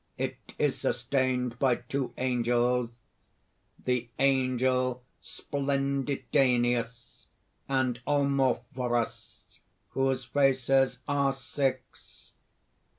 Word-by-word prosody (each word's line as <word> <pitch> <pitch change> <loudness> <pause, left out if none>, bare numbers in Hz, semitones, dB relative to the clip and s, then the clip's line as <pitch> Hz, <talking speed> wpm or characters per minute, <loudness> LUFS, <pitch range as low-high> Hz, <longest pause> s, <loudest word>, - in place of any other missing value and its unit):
It - - -2 0.2
is - - +1
sustained 125 -1 0
by 130 -3 +3
two 130 +2 -3
angels 125 -1 +1 1.0
the 125 -2 0
Angel 130 -1 +1 0.2
Splenditeneus, 135 -3 -1 0.4
and 130 -3 +1
Omophorus, 130 -4 -1 0.3
whose 135 -1 0
faces 135 -1 +2
are 140 -1 +2
six. 135 -1 -4
130 Hz, 70 wpm, -29 LUFS, 125-135 Hz, 1.0 s, by